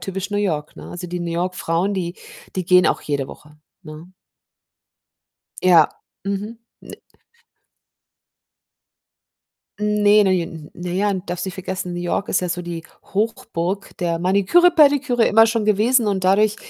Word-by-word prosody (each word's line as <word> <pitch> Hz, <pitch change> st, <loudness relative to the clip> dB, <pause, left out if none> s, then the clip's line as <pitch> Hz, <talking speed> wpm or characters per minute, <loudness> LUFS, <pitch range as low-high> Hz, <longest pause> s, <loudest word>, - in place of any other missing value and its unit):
typisch 195 Hz, +1 st, -5 dB
New 205 Hz, -, -1 dB
York, 155 Hz, -7 st, -2 dB
ne? -, -, -10 dB
Also, 180 Hz, 0 st, -7 dB
die 175 Hz, 0 st, -5 dB
New 170 Hz, -1 st, -3 dB
York 180 Hz, +2 st, -2 dB
Frauen, 180 Hz, +4 st, -1 dB
die 175 Hz, -2 st, -4 dB, 0.4 s
die 185 Hz, -, -1 dB
gehen 180 Hz, 0 st, +5 dB
auch -, -, +1 dB
jede 140 Hz, -2 st, -2 dB
Woche, 150 Hz, 0 st, -14 dB, 0.3 s
ne? 160 Hz, +2 st, -11 dB, 1.5 s
Ja, 175 Hz, -4 st, +6 dB, 0.4 s
mhm. 205 Hz, +3 st, -4 dB, 0.2 s
Ne -, -, -12 dB, 2.8 s
Ne, 210 Hz, 0 st, +4 dB
ne, 190 Hz, -, +3 dB
j 180 Hz, -, +1 dB
n 165 Hz, -3 st, -9 dB
naja, 180 Hz, +4 st, -1 dB
darfst 180 Hz, -1 st, -4 dB
nicht 185 Hz, -, -5 dB
vergessen, 185 Hz, -1 st, -5 dB
New 175 Hz, -, -4 dB
York 175 Hz, +3 st, -2 dB
ist -, -, +1 dB
ja 180 Hz, -, -3 dB
so 175 Hz, +1 st, -3 dB
die 170 Hz, -1 st, -6 dB, 0.3 s
Hochburg 205 Hz, -4 st, -2 dB
der 170 Hz, -2 st, -1 dB
Maniküre, 200 Hz, -, +4 dB
Pediküre, 285 Hz, -7 st, +3 dB
immer 225 Hz, +1 st, +6 dB
schon 225 Hz, -1 st, -1 dB
gewesen 220 Hz, +3 st, +3 dB
und 190 Hz, -2 st, -1 dB
dadurch 205 Hz, +3 st, +3 dB
185 Hz, 150 wpm, -20 LUFS, 175-210 Hz, 2.8 s, Ja